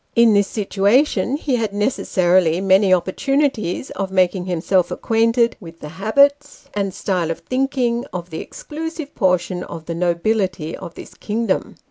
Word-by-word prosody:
In 235 -2 +6
this 200 -1 +3
situation 210 +4 +1
ho 285 -4 -1
had 220 -3 -2
necessarily 185 -6 +2
many 195 0 +4
opportunities 220 - 0
of 195 -1 -3
making 185 -1 +1
himself 180 +1 +1
acquainted 230 +1 +1
with 165 -3 -12
the 150 - -8
habits, 280 - +1
and 200 -2 -1
style 180 -3 -2
of 165 - -4
thinking, 255 -2 -1
of 180 -1 -6
the 160 - -4
exclusive 315 -1 -7
portion 180 -1 0
of 165 -1 -9
the 170 - -4
nobility 175 -1 -1
of 170 - -9
this - - -11
kingdom. 220 -1 -2
195 Hz, 145 wpm, -20 LUFS, 180-235 Hz, -, In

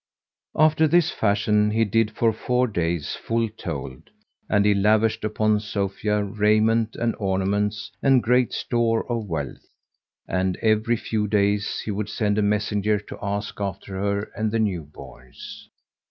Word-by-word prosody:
After 155 +1 +4
this 175 +1 +3
fashion 105 0 +2
he 110 +1 +2
did 110 +1 +1
for 115 +1 +1
four 125 +3 0
days 85 - -2
full 115 0 -1
told, 70 -11 -7 0.4
and 105 0 +3
he 105 - +5
lavished 105 +2 +2
upon 110 0 +1
Sophia 105 0 -1
raiment 110 +2 +2
and 115 -1 -1
ornaments 100 +2 -1
and 135 -3 +4
great 125 +1 +2
store 115 -2 0
of 115 -3 -2
wealth; 80 -3 -5 0.6
and, 95 0 -1
every 110 +2 +2
few 110 -1 -2
days 100 0 +1
he 110 - -2
would 105 +1 -3
send 105 -2 0
a - - +3
messenger 105 0 +1
to 100 - -10
ask 100 0 -4
after 100 0 -5
her 100 0 0
and 110 0 -1
the 115 - 0
new 100 -7 0
borns. 65 -3 -12
105 Hz, 150 wpm, -24 LUFS, 100-115 Hz, 0.6 s, he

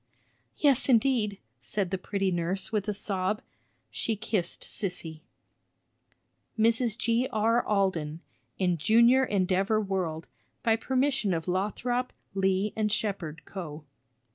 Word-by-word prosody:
"Yes, 280 -2 +3
indeed!" 230 -4 +3 0.2
said 180 - -2
the 190 - 0
pretty 195 0 -1
nurse, 180 +3 -1
with 210 -2 -1
a - - +1
sob; 200 0 -1 0.5
she 225 - -1
kissed 210 -3 -2
Sissy. 165 -5 -4 1.4
_Mrs. 230 0 +2
G.R. 230 -1 +2
Alden, 170 -6 0 0.4
in 180 -3 +1
Junior 235 - +5
Endeavor 195 0 +1
World, 185 -6 -2 0.4
by 225 -1 +4
permission 260 -5 +1
of 165 +1 -4
Lothrop, 235 +7 -1 0.2
Lee 195 +1 +1
& 215 - +3
Shepard 190 -8 -2
Co. 155 -5 -7
200 Hz, 115 wpm, -28 LUFS, 185-225 Hz, 1.4 s, Junior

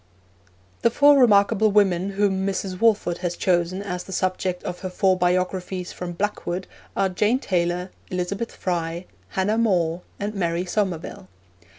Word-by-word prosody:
The - - +4
four 285 +4 +6
remarkable 215 -2 +5
women 195 -2 +2
whom 195 -1 +1
Mrs. 190 -1 -2
Walford 205 -6 +2
has 175 -1 -3
chosen 180 +1 +1
as 180 -3 -4
the - - -11
subjects 185 -1 -1
of 180 - -4
her 185 - -4
Four 190 0 +2
Biographies 180 0 -1
from 175 -1 -5
'Blackwood' 190 -1 -2 0.3
are 195 - +3
Jane 210 +6 +1
Taylor, 180 -4 -1 0.2
Elizabeth 185 +5 -3
Fry, 170 -1 -2 0.3
Hannah 210 +4 +2
More, 175 -6 +1 0.2
and 205 +1 -3
Mary 175 -2 -1
Somerville. 180 - -3
185 Hz, 145 wpm, -23 LUFS, 180-200 Hz, 0.3 s, four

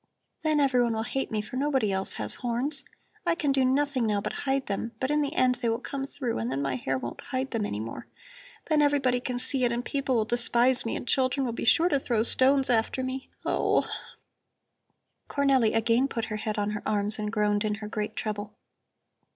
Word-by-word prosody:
Then 310 -1 +2
everyone 250 -4 +3
will 220 - -1
hate 270 +3 -2
me, 215 -1 -2
for 235 +4 -6
nobody 265 -6 +1
else 190 0 +2
has - - -1
horns. 265 +4 0 0.4
I 340 -2 +2
can 295 -4 0
do 270 -1 +3
nothing 265 -2 +1
now 210 -1 +1
but - - -4 0.2
hide 270 0 +1
them, 220 +3 -3
but 260 +2 -1
in 300 0 +2
the 290 +2 -2
end 250 -5 +3
they 235 - +1
will 225 - +1
come 270 +2 -5
through 260 - -3
and 115 +3 -2
then 135 - -1
my 140 -2 -1
hair 130 +2 -1
won't 120 -2 -6
hide 265 0 -3
them 220 -3 -1
any 105 - -4
more. 115 +1 -6 0.6
Then 310 -2 +3
everybody 275 -4 +2
can 250 0 -3
see 255 +1 0
it 240 - +3
and 240 +1 -2
people 275 -2 -1
will 220 -2 +2
despise 240 +1 +2
me - - -2
and - - -6
children 265 +1 +2
will 235 - -2
be - - -4
sure 325 +8 +5
to 285 - +2
throw 235 -4 0
stones 265 +3 +5
after 240 +2 +1
me. 260 +1 -4 0.2
Oh!" - - +1 1.4
Cornelli 270 -6 +2
again 230 +4 +3
put 230 -4 -3
her - - -2
head 215 0 -3
on 205 0 0
her 210 - -4
arms 210 +1 0
and 210 0 -2
groaned 210 -1 +1
in 210 -1 0
her 210 0 -7
great 215 0 -4
trouble. 210 -1 -4
245 Hz, 215 wpm, -27 LUFS, 215-270 Hz, 1.4 s, sure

